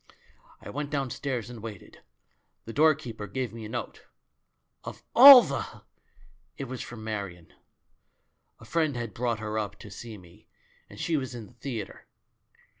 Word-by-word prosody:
"I - - -9
went 145 0 -4
downstairs 135 -4 -3
and 115 -3 -10
waited. 105 -4 -10 0.6
The 115 - -7
door 155 +3 +5
keeper 115 -8 -8
gave 120 +2 -4
me 115 -1 -8
a - - -8
note. - - -6 0.8
Of - - -9
all 260 0 +12
the! - - -5 0.7
It 140 - -4
was 130 -1 -6
from 120 -2 -9
Marion. 100 -6 -6 1.1
A - - -14
friend 160 -4 0
had 115 -3 -5
brought 120 0 -1
her 110 0 -3
up 100 -1 -5
to 105 -1 -12
see 110 +2 -9
me, 90 +3 -18 0.4
and - - -13
she 165 -2 0
was 130 -3 -4
in 115 -3 -7
the 125 - -19
theatre. 120 -4 -7
115 Hz, 160 wpm, -28 LUFS, 105-135 Hz, 1.1 s, all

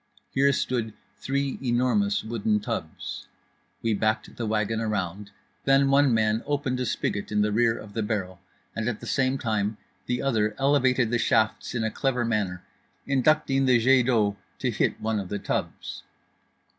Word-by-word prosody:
Here 140 +1 +3
stood 120 -5 -1 0.2
three 140 0 -2
enormous 130 - +1
wooden 110 -2 0
tubs. 105 - -5 0.6
We 115 -1 +2
backed 110 +2 -1
the 115 - -3
wagon 110 +1 0
around; 105 -2 -3 0.4
then 135 0 +4
one 140 -1 +5
man 110 0 +2
opened 140 -3 -1
a 125 - -1
spigot 100 -1 -2
in 105 0 +2
the 105 - +1
rear 115 +1 +2
of 105 -1 -10
the 115 - -1
barrel, 95 -4 -3 0.3
and 115 +1 -1
at 115 - -4
the - - -9
same 135 -1 +1
time 110 -3 -1 0.3
the 125 +1 -1
other 110 -6 +1
elevated 130 -4 +3
the 120 - +2
shafts 110 +2 +1
in 115 - 0
a 110 - -1
clever 125 -2 0
manner, 100 -6 -1 0.4
inducting 135 0 +2
the 125 -1 +6
jet 125 +1 +4
d'eau 105 -5 +2 0.2
to - - -1
hit - - 0
one 110 -1 -1
of 95 -2 -6
the 105 - -2
tubs. - - -4
115 Hz, 170 wpm, -26 LUFS, 105-135 Hz, 0.6 s, the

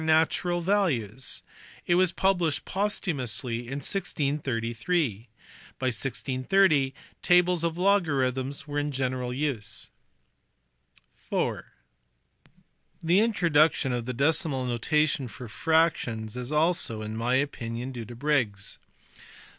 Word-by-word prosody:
natural 165 +2 +2
values: 140 - 0 0.4
it 175 - +2
was 180 0 +4
published 175 -5 +1
posthumously 140 - -1
in 135 +3 -4
1633. 135 - -1 0.5
By 130 - -4
1630 135 - +1 0.3
tables 180 -1 +4
of 170 0 -1
logarithms 140 -9 +1
were 145 0 -1
in 145 0 -1
general 130 -2 -2
use. 125 -6 -3 1.4
(iv) - - 0 1.4
The 170 +4 +4
introduction 165 - +3
of 120 -1 -3
the 125 - -2
decimal 140 0 +1
notation 140 +3 +1
for 120 +1 -9
fractions 120 -5 +1
is 125 +2 -5
also 155 -8 +1
(in 110 +1 -5
my 120 +3 +1
opinion) 125 -2 -2
due 120 -3 -6
to 120 +2 -10
Briggs. 120 -7 -1
140 Hz, 105 wpm, -27 LUFS, 125-165 Hz, 1.4 s, was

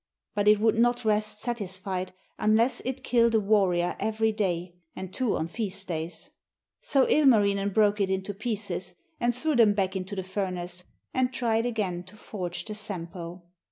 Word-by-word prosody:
But 205 0 0
it 210 0 +6
would 225 +1 +3
not 240 0 +2
rest 215 0 0
satisfied 190 -5 -3 0.3
unless 225 +4 +3
it 260 +1 -3
killed 235 -1 +3
a - - +5
warrior 195 -4 +2
every 220 0 +1
day, 180 -5 -1 0.2
and 190 0 -7
two 255 -5 0
on 160 - -2
feast 195 0 -4
days. 160 -1 -5 0.5
So 270 -2 +3
Ilmarinen 205 -9 +4
broke 210 0 +3
it 195 - +1
into 190 +1 -2
pieces 195 -4 -3 0.2
and 240 0 +1
threw 305 +4 0
them 220 -4 +5
back 195 -1 0
into 190 +2 -4
the 190 - -3
furnace, 180 -2 -4 0.3
and 255 -1 +1
tried 235 -2 +1
again 200 -7 -2
to 190 - -13
forge 180 -4 -5
the 215 - -4
Sampo. 175 -4 -4
205 Hz, 165 wpm, -27 LUFS, 185-225 Hz, 0.5 s, it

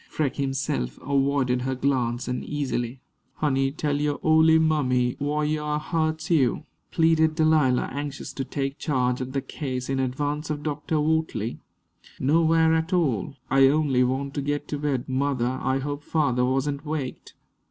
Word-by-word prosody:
Freke 140 -5 -2
himself 135 - -2
avoided 135 -2 +1
her 130 +1 -2
glance 125 -3 0
uneasily. 125 -1 -3 0.4
"Honey, 135 -2 +1
tell 145 0 -1
yo' 150 -1 0
ole 160 0 +5
mammy 130 -6 +2
wh'yar 150 +1 -1
hu'ts 160 +1 -2
you," 140 -7 +2 0.3
pleaded 160 -1 +3
Delilah, 155 -6 +3
anxious 145 0 -5
to 135 - -3
take 135 +1 -4
charge 125 -4 0
of 130 +1 -5
the 135 -1 -1
case 130 -2 -5
in 135 - 0
advance 145 +4 -2
of 150 -1 -3
Dr. 150 +2 -2
Wortley. 155 -7 -1 0.6
"Nowhere 160 +3 +3
at 160 +2 0
all. 135 - 0 0.2
I 135 0 +6
only 140 -3 +3
want 135 +2 -1
to 145 - -2
get 145 +1 -2
to 145 - -3
bed. 140 -4 -1
Mother, 130 -1 0
I 130 0 +1
hope 145 +2 -4
father 125 -7 +1
wasn't 140 +2 -1
waked." 150 -4 -5
140 Hz, 150 wpm, -25 LUFS, 130-155 Hz, 0.6 s, I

